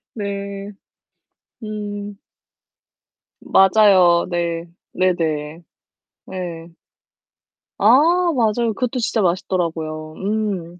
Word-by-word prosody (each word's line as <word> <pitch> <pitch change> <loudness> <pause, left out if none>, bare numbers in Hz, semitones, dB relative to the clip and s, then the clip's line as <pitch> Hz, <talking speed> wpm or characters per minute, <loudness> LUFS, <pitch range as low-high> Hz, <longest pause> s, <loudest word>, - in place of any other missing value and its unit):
네. 200 -1 -5 0.9
음. 205 -1 -6 1.2
맞아요. 190 -3 +5
네. 170 -1 -2 0.3
네네. 160 -3 -1 0.7
예. 170 -3 -6 1.1
아 210 +3 +5 0.4
맞아요. 230 -1 +1
그것도 250 +3 -2
진짜 225 -1 0
맛있더라고요. 165 -4 -2
음. 195 -4 -3
190 Hz, 140 characters per minute, -20 LUFS, 170-210 Hz, 1.2 s, 맞아요